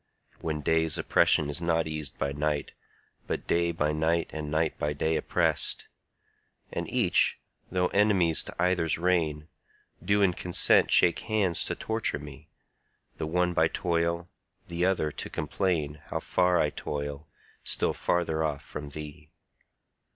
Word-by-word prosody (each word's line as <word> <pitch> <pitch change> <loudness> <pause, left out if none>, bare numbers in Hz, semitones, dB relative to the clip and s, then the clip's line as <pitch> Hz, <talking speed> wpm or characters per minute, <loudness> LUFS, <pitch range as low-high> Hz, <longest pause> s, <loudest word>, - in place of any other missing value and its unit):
When 80 -2 -3
day's 80 +2 +2
oppression 75 -2 +3
is 75 +3 -4
not 80 -1 +1
eas'd 75 -3 -5
by 70 0 -1
night, 75 0 -2 0.5
But - - -3
day 85 0 +2
by 75 -2 0
night 80 +2 0
and 75 -1 -4
night 80 +2 0
by 75 0 0
day 80 +2 0
oppress'd, - - 0 0.9
And - - -3
each, - - +2 0.3
though 90 -1 +1
enemies 95 -6 +3
to - - -8
either's 85 -2 +1
reign, 80 -4 0 0.6
Do 100 0 +3
in 90 -2 +4
consent 90 0 +3
shake 85 - +4
hands 100 -6 0
to - - -2
torture 110 -6 -1
me, 75 +1 -11 0.7
The 80 - -3
one 90 +2 +1
by 80 -1 +4
toil, 85 0 -1 0.4
the 85 +1 0
other 85 -5 +1
to - - -6
complain 80 -6 -1
How - - -2
far 90 -1 +2
I 75 - +2
toil, 75 +1 -5 0.4
still - - +1
farther 80 -2 0
off 75 -3 -2
from 75 -1 -7
thee. 75 +1 -9
80 Hz, 145 wpm, -28 LUFS, 75-90 Hz, 0.9 s, in